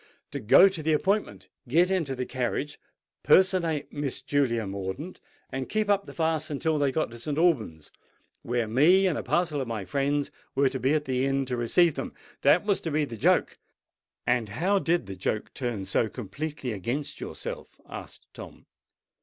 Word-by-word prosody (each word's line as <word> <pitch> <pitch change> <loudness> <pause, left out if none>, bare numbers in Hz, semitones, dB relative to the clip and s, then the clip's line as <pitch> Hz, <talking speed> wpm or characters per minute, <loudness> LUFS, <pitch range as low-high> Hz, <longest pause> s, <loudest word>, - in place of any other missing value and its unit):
—to 140 - -4
go 115 - +7
to 185 -4 -3
the 155 +1 +1
appointment, 200 +7 0 0.2
get 170 +8 +3
into 160 -8 0
the 125 0 -3
carriage, 130 +4 -3 0.4
personate 170 -6 +3
Miss 145 -3 -3
Julia 130 -5 0
Mordaunt, 100 - -6 0.3
and 135 0 -4
keep 215 -1 +1
up 200 0 +1
the - - -9
farce 160 -2 0
until 150 +1 0
they 140 -2 +2
got 155 -2 -1
to 120 - -10
St. 145 +4 -3
Alban's, 115 - +1 0.5
where 120 -1 -1
me 160 - +5
and 180 -5 +2
a - - -2
parcel 160 -5 0
of 130 - -4
my 110 -4 -4
friends 140 +7 0 0.2
were 135 0 +3
to 130 0 -4
be 135 +4 +2
at 150 -1 -1
the 130 -1 0
inn 135 0 +1
to 125 -1 -2
receive 155 +8 +3
them. 135 - -6 0.3
That 165 +8 +4
was 200 -2 +1
to 165 - -3
be 150 0 +1
the 120 - -8
joke." 110 - +2 0.7
"And 120 -3 +1
how 185 - +1
did 175 - +1
the 95 0 -7
joke 105 +2 -3
turn 120 -7 -3
so 110 +3 +1
completely 135 +4 -5
against 130 +9 -4
yourself?" - - -7
asked - - -9
Tom. - - -11
140 Hz, 185 wpm, -27 LUFS, 120-160 Hz, 0.7 s, go